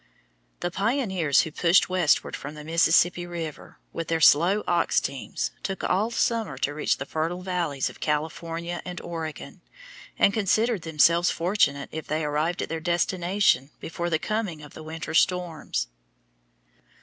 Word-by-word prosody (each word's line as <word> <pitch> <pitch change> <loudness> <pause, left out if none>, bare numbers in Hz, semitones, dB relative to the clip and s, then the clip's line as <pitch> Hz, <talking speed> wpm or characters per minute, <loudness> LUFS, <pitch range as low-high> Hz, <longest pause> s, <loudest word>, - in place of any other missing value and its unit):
The 175 - -2
pioneers 195 - +1
who 160 - -4
pushed 170 +3 +4
westward 180 -5 +1
from 145 +2 -7
the 150 - -9
Mississippi 170 +2 +3
River 165 -3 -7 0.2
with 165 - -4
their 165 0 0
slow 175 +7 +5
ox 170 -1 +2
teams 135 -1 -4
took 195 -1 -4
all 210 +5 +1
summer 230 -1 0
to 145 - -1
reach 150 - 0
the 135 - -5
fertile 165 +5 -3
valleys 170 -8 -1
of - - -9
California 165 +3 -3
and 180 -1 -6
Oregon, 160 -3 -6 0.6
and 200 - +4
considered 220 +1 +1
themselves 170 +2 +3
fortunate 170 -6 +1
if 160 -1 -6
they 155 +1 -1
arrived 150 +4 -1
at - - -6
their 165 - -3
destination 175 -3 +1
before 170 +1 -4
the 160 - +2
coming 195 -5 -3
of 145 - -12
the - - -10
winter 160 0 -6
storms. 165 - +1
170 Hz, 150 wpm, -26 LUFS, 155-180 Hz, 0.6 s, slow